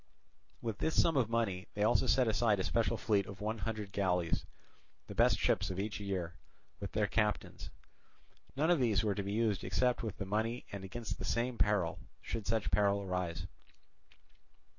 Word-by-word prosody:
With 115 -3 -3
this 160 - +1
sum 165 - +4
of 125 -5 +2
money 110 -5 -1
they 105 - +1
also 120 +4 +3
set 125 +1 +4
aside 110 -2 +2
a - - +1
special 115 +3 +1
fleet 100 -4 +1
of 100 -1 -9
one 110 +2 -2
hundred 105 -1 -4
galleys, 90 -4 0 0.6
the - - -8
best - - +4
ships - - +1
of 95 0 -4
each 105 +1 -3
year, 95 -4 -3 0.5
with 100 -2 -6
their 105 -1 +2
captains. 105 0 -1 0.9
None 155 +5 +2
of 175 - +4
these 110 -6 +2
were 105 -2 +1
to 100 - -2
be 100 +1 -3
used 110 -3 +1
except 125 -1 +1
with 110 -4 -4
the 95 - -4
money 110 +5 -1
and 100 -1 -6
against 100 0 -5
the - - -5
same 120 +1 -1
peril, 95 -6 +2 0.2
should 110 -3 -4
such 110 -1 0
peril 100 -1 +3
arise. 90 -3 -2
105 Hz, 185 wpm, -34 LUFS, 100-115 Hz, 0.9 s, sum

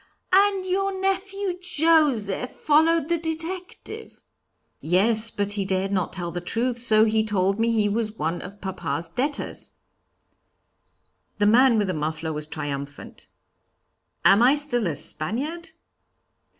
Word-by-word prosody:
'" - - -15
"And 390 -1 +4
your 385 +1 -1
nephew 385 -1 -2
Joseph 290 - +2
followed 315 +1 +2
the 340 0 0
detective?" 350 +7 -6 0.6
"Yes, 215 +7 +2
but 205 -2 -2
he 205 -1 -1
dared 190 0 -1
not 185 -3 -1
tell 175 -2 -4
the 175 +1 -4
truth, 235 +6 -1
so 220 -2 +5
he 220 0 +2
told 195 -1 0
me 230 +1 +2
he 215 -2 +2
was 215 +1 -1
one 165 +3 -2
of 200 +2 -10
papa's 170 -3 -4
debtors.' 275 - -3 1.6
The 205 - +2
man 235 +3 +5
with 210 - +2
the 185 - -2
muffler 155 +1 -3
was 150 0 -4
triumphant. 145 -2 -7 1.0
'Am 200 +3 +6
I 255 +4 +6
still 255 -8 0
a 160 - -2
Spaniard?' 270 - -4
225 Hz, 135 wpm, -24 LUFS, -, 1.6 s, Am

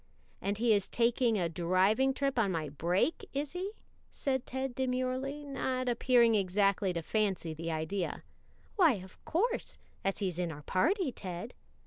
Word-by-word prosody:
"And 200 +1 -1
he 230 0 +4
is 200 -2 +1
taking 235 -1 +2
a 175 -3 +1
driving 185 +10 +2
trip 275 -2 0
on 200 -4 +2
my 160 -4 -2
break, 175 - 0
is 280 +1 -2
he?" 375 +4 -4 0.4
said 265 -3 -2
Ted 265 0 -3
demurely, 260 +3 -1
and 285 -1 -8
not 255 -1 -1
appearing 240 -1 +4
exactly 195 -1 +2
to 170 -1 -3
fancy 195 -5 0
the 165 +2 -5
idea. 160 +3 -2 0.5
"Why, 340 -8 +6
of 190 -3 -10
course, 460 +9 -1 0.3
as 195 - 0
he's 185 -4 -2
in 175 -2 -1
our 150 -1 -9
party, 320 - +1
Ted." 185 +1 -6
220 Hz, 160 wpm, -32 LUFS, 185-265 Hz, 0.5 s, Why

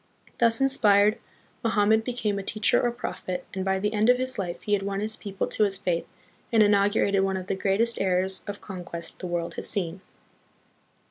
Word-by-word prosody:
Thus 230 -1 +4
inspired, 215 -6 +4 0.4
Mo 230 - +2
hammed 220 +1 +3
became 220 -4 -2
a - - -3
teacher 215 +2 +2
or 240 - +2
prophet, 185 -6 -5
and 190 - -3
by 190 0 +1
the 210 +2 -1
end 215 +2 +2
of 250 - +6
his 255 -2 -3
life 175 -3 -4
he 210 - -1
had 200 - +2
won 195 0 -3
his 215 +1 -2
people 195 -2 -4
to - - 0
his 195 -2 +1
faith 175 -3 -2 0.4
and 225 -2 +5
inaugurated 200 -1 +3
one 190 -1 0
of 185 - -6
the - - -2
greatest 200 +5 0
eras 185 0 0
of 205 0 -6
conquest 175 -3 -7
the 185 - -4
world 175 -1 -3
has - - -2
seen. 185 -3 -2
200 Hz, 200 wpm, -26 LUFS, 190-220 Hz, 0.4 s, of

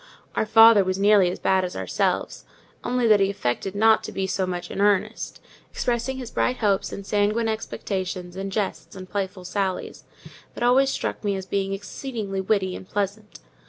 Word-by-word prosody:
Our 220 - 0
father 225 -2 +7
was 185 0 -1
nearly 200 -2 +5
as 180 - -4
bad 190 -1 +2
as 180 - -4
ourselves; - - -1 0.4
only 250 -1 0
that 215 -2 +6
he 195 0 +3
affected 190 +2 -2
not 220 +1 +4
to - - -6
be 195 - -2
so 190 0 -1
much 175 -1 -4
in 195 - -3
earnest: 205 -2 0 0.3
expressing 245 +2 -2
his 250 -3 -7
bright 250 - 0
hopes 200 -3 +1
and 200 - -7
sanguine 210 +3 +1
expectations 185 -4 -4
in 195 +1 -4
jests 200 0 -3
and 185 -1 -9
playful 190 -1 -4
sallies, 190 0 -3 0.5
that - - -4
always 260 +3 +4
struck - - -3
me 200 -1 0
as 190 -1 -5
being 195 0 -1
exceedingly 205 -1 -4
witty 190 -2 0
and 185 - -10
pleasant. 205 +1 -4
200 Hz, 180 wpm, -24 LUFS, 190-220 Hz, 0.5 s, father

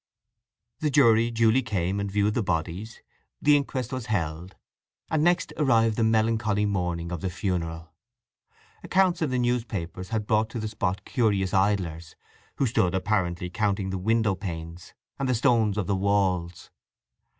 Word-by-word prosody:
The 155 - 0
jury 115 -5 +4
duly 115 +2 +3
came 100 -4 -2
and 100 0 -2
viewed 105 +1 +1
the 115 - 0
bodies, 90 +4 -3 0.4
the 150 0 +5
inquest 130 -3 -2
was 130 -3 -4
held; 85 -3 -3 0.6
and 155 -1 +2
next 175 0 +2
arrived 115 -7 +3
the 115 - +1
melancholy 110 -1 +2
morning 90 -4 -2
of 85 -3 -4
the 95 - -2
funeral. 85 -3 -3 0.9
Accounts 185 -2 +2
in 155 - +1
the 130 - -1
newspapers 105 -8 -2
had 110 -2 -2
brought 110 +1 +1
to 115 - -5
the 110 - -3
spot 100 -3 -2
curious 100 -7 0
idlers, 90 -5 0 0.4
who 135 - +1
stood 95 -7 +1
apparently 90 -3 -1
counting 100 -1 -1
the 95 - -3
window 110 +1 +2
panes 85 -3 -7 0.2
and 135 -1 -1
the 125 - +2
stones 110 -3 +2
of 105 - 0
the 100 - 0
walls. 95 -3 0
105 Hz, 155 wpm, -26 LUFS, 90-115 Hz, 0.9 s, the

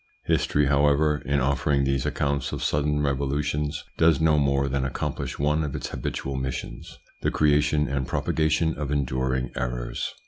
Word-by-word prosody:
History, 75 0 +2
however, 75 +1 +3
in 70 -1 +2
offering 70 +1 +1
these 70 -1 0
accounts 70 -2 -1
of - - -4
sudden 75 0 +1
revolutions 70 +1 -1 0.2
does 80 -3 +5
no 80 -2 +4
more 70 -1 +2
than 70 0 -1
accomplish 65 -1 -3
one 75 +2 +1
of 75 -3 -4
its - - -4
habitual 70 0 -4
missions: 65 -2 -5 0.2
the - - +1
creation 75 0 +2
and 70 -1 -2
propagation 80 +2 +1
of 75 -2 -4
enduring 65 -2 -1
errors. - - -3
70 Hz, 150 wpm, -25 LUFS, 65-75 Hz, 0.2 s, does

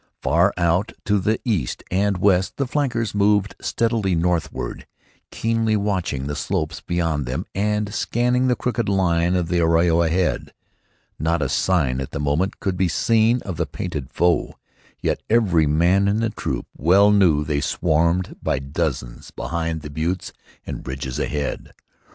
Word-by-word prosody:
Far 85 +5 +3
out 90 +5 +1
to 105 0 +2
the 105 +4 0
east 95 - -1
and 100 +1 +1
west 95 0 +2
the 140 - 0
flankers 125 -5 -1
moved 105 0 +2
steadily 110 -5 0
northward, 85 -7 -2 0.4
keenly 115 -1 0
watching 95 -10 -1
the 75 +1 -3
slopes 80 -1 -2
beyond 80 -6 -1
them 65 +9 -3
and 105 +1 -1
scanning 125 +2 +1
the 125 - +3
crooked 120 -4 -1
line 90 -2 +2
of 90 -2 0
the 85 +1 +1
arroyo 85 0 +3
ahead. 85 +2 0 0.7
Not 80 0 +1
a 65 - -1
sign 70 -9 +1
at 65 - -7
the - - -3
moment 75 +7 0
could 95 -2 -2
be 95 - +2
seen 115 - +2
of 90 -5 -5
the 85 - -1
painted 75 -2 -5
foe, 85 0 +1 0.5
yet - - 0
every 95 -9 +3
man 90 +6 +3
in 100 +1 +2
the 115 -1 0
troop - - -3
well 95 +6 +5
knew 90 -8 +4
they 75 -1 -1
swarmed 85 +4 +1
by 70 - 0
dozens 70 -3 -3
behind 80 -1 -3
the 75 -1 -8
buttes 85 +5 -3 0.3
and - - -7
ridges 65 -1 -4
ahead. 75 -1 -3
90 Hz, 155 wpm, -22 LUFS, 80-105 Hz, 0.7 s, well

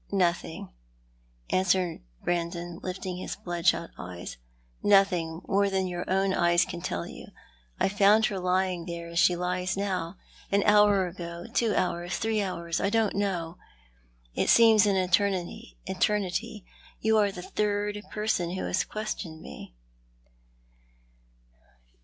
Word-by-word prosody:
"Nothing," 170 - -1 0.8
answered 185 -2 +1 0.2
Brandon, 175 0 -2
lifting 185 0 -4
his 185 - -5
bloodshot 175 -1 0
eyes. 90 -5 -7 0.3
" - - -37 0.2
Nothing 180 -5 +3
more 200 +1 +2
than 190 -1 0
your 175 -1 -4
own 190 +1 +2
eyes 175 -1 +3
can 175 -2 -7
tell 85 - -3
you. - - -10 0.5
I - - +3
found 205 +2 +4
her 195 -3 -2
lying 180 -1 0
there, 170 -1 -6
as 170 0 -1
she 175 +1 +5
lies 180 +1 -2
now. 185 -3 -2 0.4
An 200 0 +3
hour 205 -2 +5
ago, 170 -1 -7
two 225 -3 +2
hours, 175 0 -1
three 220 -1 0
hours? 170 -3 -3
I 195 - +1
don't 225 -1 +1
know. 180 -4 -2 0.7
It - - 0
seems 220 -2 +7
an 200 - +2
eternity. 185 - 0 1.2
You 220 0 +3
arc 205 -2 +1
the 180 - -7
third 205 0 -1
person 210 -5 -1
who 185 - -3
has 185 - +1
questioned 210 -7 -5
me." - - -11
185 Hz, 135 wpm, -28 LUFS, 175-200 Hz, 1.2 s, seems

